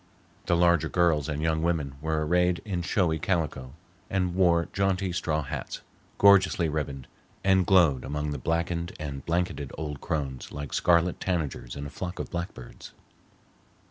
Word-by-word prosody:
The 85 - +3
larger 85 -2 +3
girls 80 -5 +2
and 75 0 -2
young 80 -1 +1
women 80 -5 0
were 80 0 0
arrayed 90 +1 +2
in 95 -4 -2
showy 85 -2 +1
calico, 75 -6 -2 0.3
and 90 -2 0
wore 85 -2 +3
jaunty 95 -1 0
straw 80 -3 -1
hats, 70 - -5 0.4
gorgeously 95 -4 +5
ribboned, 70 -4 -3 0.4
and 95 -2 +3
glowed 85 -9 +4
among 75 +2 -3
the 70 - -4
blackened 85 +3 -1
and 70 -3 -5
blanketed 85 -5 -1
old 75 -2 -5
crones 70 -5 -3
like 75 0 -6
scarlet 85 0 +3
tanagers 75 -9 -3
in 70 0 -5
a 70 - -7
flock 90 0 -5
of - - -5
blackbirds. 85 -8 -7
85 Hz, 150 wpm, -27 LUFS, 75-90 Hz, 0.4 s, gorgeously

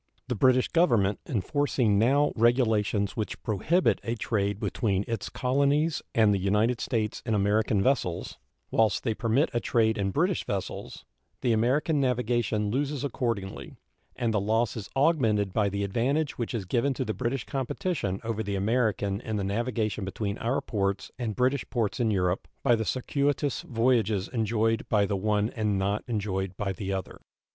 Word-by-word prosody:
The 125 - 0
British 130 +3 +4
Government 115 - +2
enforcing 125 -3 +1
now 140 +6 +3
regulations 110 -5 +2
which 115 +1 -3
prohibit 150 - +1
a 115 - -2
trade 100 -3 -1
between 100 -5 -1
its 115 -3 -3
colonies 140 +5 +1
and 110 -2 +5
the 100 - +1
United 105 +5 +1
States 110 -3 -1
in 110 -2 0
American 105 0 +2
vessels, 95 -10 -1 0.3
whilst 110 -4 +2
they 115 - 0
permit 115 +7 +1
a 120 - +1
trade 110 -2 +1
in 95 -1 0
British 175 - +1
vessels, 95 -2 -5 0.4
the 120 - +2
American 140 +7 +2
navigation 120 -4 0
loses 140 +2 -1
accordingly, 115 -7 -3 0.4
and 115 -2 -1
the 105 - +1
loss 110 +2 +1
is 110 -3 -6
augmented 115 - +2
by 105 -2 +2
the 100 +1 -2
advantage 135 +9 0
which 120 0 -3
is 105 -5 -3
given 130 +7 0
to 130 - -2
the 110 - -2
British 120 +4 -2
competition 135 - -2
over 110 -1 -2
the 100 -2 -2
American 100 -1 0
in 110 -2 -4
the 100 - -1
navigation 110 +1 -1
between 100 +2 -3
our 120 +4 0
ports 100 -3 -2
and 115 -4 -2
British 130 +2 +1
ports 115 -1 -1
in 115 -2 +2
Europe 90 -3 0 0.2
by 120 -3 +5
the 110 -1 -2
circuitous 140 +3 0
voyages 115 - +1
enjoyed 115 -1 0
by 105 -2 +3
the 100 - -1
one 105 +2 0
and 105 -3 0
not 100 +2 0
enjoyed 95 -4 -2
by 95 -2 -2
the 100 0 -4
other. 95 -2 -5
110 Hz, 165 wpm, -27 LUFS, 100-125 Hz, 0.4 s, and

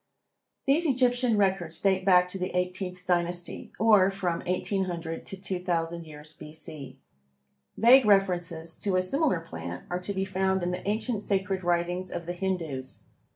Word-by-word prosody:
These 310 +5 +3
Egyptian 250 -3 +2
records 190 -5 0
date 190 -1 +1
back 180 -2 +5
to 190 - -5
the 185 +1 -2
eighteenth 180 0 -3
dynasty, 175 -1 -1
or 210 -4 +6
from 185 -4 -2
1800 180 -3 -2
to 195 - -7
2000 175 -3 -2
years 150 0 -10
B. 150 - -11
C. 145 -4 -7 0.8
Vague 245 +3 +7
references 175 -5 +2
to 195 -3 -1
a 185 - +4
similar 275 - +1
plant 85 - -7
are 180 - -1
to 180 +3 -3
be 190 0 0
found 190 -1 0
in 175 - 0
the 180 +2 -3
ancient 215 +1 -1
sacred 190 -2 -1
writings 175 +1 0
of 170 -1 -5
the 175 - -3
Hindoos. 170 -8 -3
180 Hz, 155 wpm, -28 LUFS, 170-195 Hz, 0.8 s, Vague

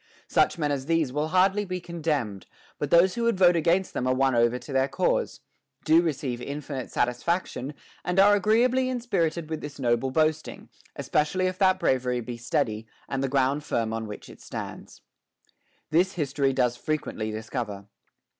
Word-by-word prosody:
Such - - +2
men 150 -3 0
as 135 -1 -3
these 165 -6 +1
will 150 +2 0
hardly 190 +4 +3
be 185 -2 -4
condemned; 150 - -3 0.3
but 145 - -2
those 175 +3 +5
who 235 - -3
would 235 -3 +1
vote 180 -2 +5
against 170 +3 +1
them 125 - -2
are 130 - +2
won 135 0 +2
over 120 +1 +3
to 135 - -9
their 135 0 +2
cause, 135 0 -1 0.4
do 160 +2 +6
receive 135 -7 -2
infinite 140 -1 -5
satisfaction, 140 +3 -1 0.3
and 180 +1 0
are 205 +1 +7
agreeably 240 +6 +3
inspirited 175 -10 -1
with 160 0 -4
this 145 -1 -8
noble 120 -1 +1
boasting, 155 +2 -1 0.3
es - - -6
pecially 170 +5 +1
if 185 0 -2
that 190 -1 +4
bravery 125 -5 +1
be 120 0 -6
steady, 115 -2 -2 0.2
and 135 -1 -2
the 135 - 0
ground 135 +2 +1
firm 115 -5 -1
on 110 -1 -3
which 105 - -9
it - - -14
stands. - - -8 0.9
This 180 +4 +3
history 140 -3 0
does 125 -2 +1
frequently 125 -5 -3
discover. 110 -2 -5
150 Hz, 175 wpm, -26 LUFS, 125-175 Hz, 0.9 s, are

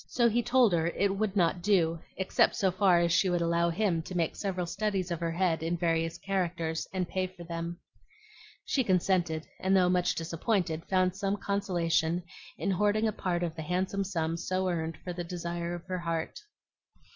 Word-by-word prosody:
So 240 -2 +3
he 235 +1 +2
told 240 -4 +4
her 165 -1 +2
it 195 +3 0
would 205 0 -1
not 175 -1 +2
do, 170 -4 +2 0.2
except 190 - +2
so 190 -2 +2
far 185 -1 +4
as 170 0 +2
she 185 +3 +3
would 175 -1 +1
allow 170 0 +2
him 170 -1 +1
to 180 +2 -6
make 165 -2 0
several 185 -3 -2
studies 190 0 -2
of 170 - -2
her 170 -1 -1
head 165 -1 +1
in 165 +2 -1
various 165 -1 0
characters 175 -4 -2
and 185 -2 -1
pay 185 +1 -1
for 185 -1 -12
them. 170 0 -5 0.9
She 265 - +1
consented, 180 -5 +1
and 190 +1 +3
though 180 -1 +4
much 180 -1 +2
disappointed 165 0 -1
found 185 -1 +2
some 200 0 -1
consolation 175 -4 0 0.3
in - - -1
hoarding 210 +3 +2
a - - +1
part 175 -2 -1
of 165 -2 -3
the 160 - -5
handsome 185 +4 -1
sum 165 -4 -2
so 185 +2 -1
earned 165 -2 -2
for 180 - -4
the 175 0 -4
desire 170 0 -4
of 175 - -9
her 185 -1 -3
heart. 165 -1 -3
180 Hz, 190 wpm, -30 LUFS, 170-190 Hz, 0.9 s, told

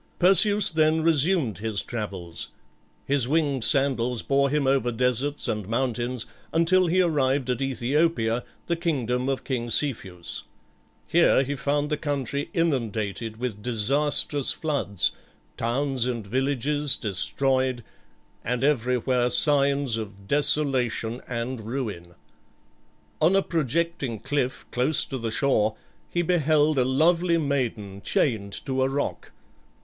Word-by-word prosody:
Perseus 200 +3 +4
then 155 0 +2
resumed 155 - +2
his 110 -1 -1
travels. 95 -7 -6 0.6
His 135 -3 +1
winged 145 -4 0
sandals 125 -4 +2
bore 140 0 +2
him 145 0 0
over 135 -2 +1
deserts 125 +4 0
and 105 -3 -3
mountains, 120 0 -2 0.3
until 175 +3 +3
he 185 +2 +3
arrived 135 -5 0
at 125 - -2
Æthiopia, 135 -2 0 0.2
the 170 - -1
kingdom 130 -7 -1
of 135 - -2
King 120 -3 -3
Cepheus. 100 - 0 0.6
Here 165 -4 +3
he 140 +2 -3
found 145 +2 -1
the 150 - 0
country 140 -1 -3
inundated 115 - -2
with 115 -4 -5
disastrous 135 +5 +2
floods, 140 - -1 0.4
towns 130 +1 0
and 120 -4 -3
villages 135 +4 +1
destroyed, 130 +4 0 0.6
and 125 +2 -2
everywhere 125 -2 +1
signs 140 -3 +4
of 100 -3 -8
desolation 130 -5 +1
and 120 0 -4
ruin. 105 -8 -5 1.1
On 170 +5 +4
a 195 - +3
projecting 160 - -2
cliff 130 0 -2
close 130 +5 +1
to 130 - -5
the 115 -1 -3
shore 110 -4 +1 0.3
he 175 - -1
beheld 155 -3 +2
a 125 - +2
lovely 170 +6 +2
maiden 120 -10 -2
chained 100 -4 -1
to 130 -1 -1
a 130 - +2
rock. 145 +1 -4
130 Hz, 125 wpm, -25 LUFS, 115-150 Hz, 1.1 s, Perseus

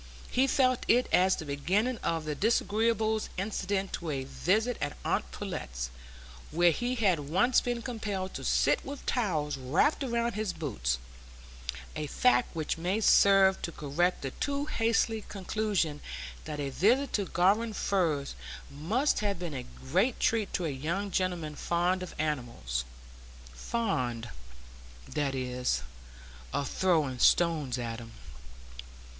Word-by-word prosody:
He 260 +2 +3
felt 255 -2 +2
it 245 +2 +4
as 185 +1 +5
the 160 - -6
beginning 190 - 0
of 165 -2 -1
the 155 - -1
disagreeables 220 +3 +1
incident 195 0 -2
to 170 - -3
a 135 -3 -2
visit 215 - +1
at 145 0 -2
aunt - - 0
Pullet's, - - -5 0.6
where 170 +2 +4
he 245 +9 -1
had 195 -9 +2
once 205 +10 +4
been 240 -1 -2
compelled 205 -6 -3
to - - -6
sit - - +2
with 280 0 -7
towels 155 - 0
wrapped 145 - +2
round 235 -3 0
his 215 -2 -2
boots; 65 - -2 1.0
a 150 - -3
fact 250 - +2
which 160 0 -2
may 185 +5 0
serve 195 -3 +5
to 170 - -3
correct 165 +4 0
the 135 - -3
too 285 - -2
hasty 225 -3 +1
conclusion 195 -6 -1 0.4
that 150 -1 -5
a 140 -1 -2
visit 245 - +2
to 205 - +1
Garum 200 +7 +2
Firs 165 -9 0 0.4
must 205 - +1
have 205 -3 -1
been 170 -3 -5
a 125 -2 -5 0.2
great 200 - +2
treat 225 -3 +1
to 180 - -1
a - - 0
young 170 +9 -2
gentleman 175 -5 -1
fond 175 +4 0
of 185 - -7
animals,—fond, 65 - -4 0.8
that 140 -2 -1
is, 125 - -1 0.7
of 140 - -1
throwing 155 -9 +1
stones 155 -7 +3
at 115 -1 -4
them. 115 -1 -11
180 Hz, 140 wpm, -30 LUFS, 140-220 Hz, 1.0 s, as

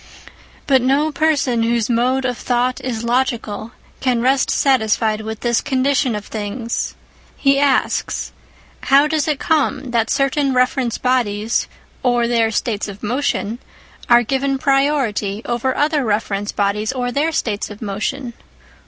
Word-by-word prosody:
But 265 -2 +4
no 280 +5 +2
person 285 -6 +1
whose 230 -1 +1
mode 255 +3 +1
of 250 -1 0
thought 250 +1 -1
is 235 -3 -3
logical 235 -3 -1 0.3
can 250 -3 +1
rest 260 +3 +2
satisfied 220 -4 +2
with 220 0 -6
this 235 -1 +1
condition 265 -2 +1
of 210 -1 -5
things. 225 +2 -4 0.4
He 275 0 +3
asks: 285 -1 0 0.3
" - - -29
How 275 +2 +6
does 310 0 0
it 300 -2 +1
come 290 -4 0
that 230 -2 +1
certain 275 0 +1
reference 250 -1 +1
bodies 230 -4 0 0.3
(or 245 -2 +2
their 230 -2 +2
states 220 -1 -2
of 200 -1 -10
motion) 240 -1 -1 0.5
are 240 0 +6
given 270 +3 0
priority 265 -7 0
over 240 +2 -1
other 295 -1 +2
reference 205 -2 -1
bodies 205 +2 0
(or 250 -2 -2
their 295 +6 0
states 215 -9 -2
of 210 0 -10
motion) 235 +5 -3
245 Hz, 145 wpm, -19 LUFS, 220-270 Hz, 0.5 s, How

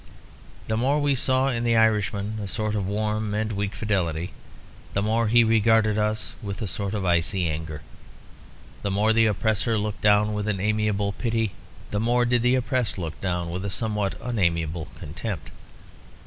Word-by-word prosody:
The 110 - 0
more 135 +5 +2
we 145 -1 +2
saw 130 +1 +2
in 120 -3 -1
the 115 -1 +2
Irishman 105 -1 +1
a - - -4
sort 110 +1 -2
of 100 -3 -1
warm 105 +1 -1
and 110 +1 -1
weak 100 0 -2
fidelity, 90 -6 -1 0.6
the 100 - 0
more 115 +2 +1
he 120 +2 +6
regarded 110 -1 +3
us 105 0 -1
with 100 -2 -5
a - - -2
sort 100 +1 -3
of 100 -2 -2
icy 85 +1 +1
anger. 80 -1 -4 1.0
The 100 - -2
more 105 +3 +2
the 115 0 +4
oppressor 110 +1 +1
looked 105 0 -3
down 105 0 +4
with 105 0 -2
an 105 -3 0
amiable 105 0 +1
pity, 115 0 -1 0.4
the 105 - 0
more 120 +2 +2
did 120 0 +2
the 125 +2 +3
oppressed 125 -3 0
look 80 -4 -5
down 90 -2 -1
with 90 +2 -4
a 100 - -2
somewhat 105 0 -1
unamiable 85 -8 0
contempt. 85 +2 -6
105 Hz, 175 wpm, -25 LUFS, 95-115 Hz, 1.0 s, he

